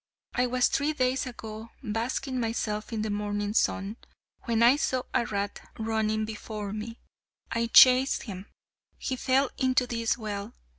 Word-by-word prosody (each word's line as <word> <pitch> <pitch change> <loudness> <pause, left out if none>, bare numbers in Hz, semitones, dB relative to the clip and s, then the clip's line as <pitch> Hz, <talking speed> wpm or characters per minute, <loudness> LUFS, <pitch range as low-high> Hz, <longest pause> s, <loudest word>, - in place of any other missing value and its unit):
I 250 0 +2
was 250 0 +3
three 290 +2 0
days 260 -1 0
ago 220 -2 -8
basking 250 +4 -2
myself 225 -2 -2
in 220 -2 -2
the 215 - -2
morning 205 0 -2
sun, 205 -1 0 0.5
when 230 -1 +2
I 245 +3 +7
saw 255 -3 0
a 235 - +1
rat 200 -1 -3 0.2
running 220 -1 0
before 210 -1 -6
me. 220 +2 -6 0.5
I 230 0 0
chased 255 +3 +7
him. 195 -3 -8 0.5
He 260 - -2
fell 265 +1 +2
into 255 -1 +3
this 230 -1 -1
well. 205 -3 -5
225 Hz, 150 wpm, -28 LUFS, 215-250 Hz, 0.5 s, I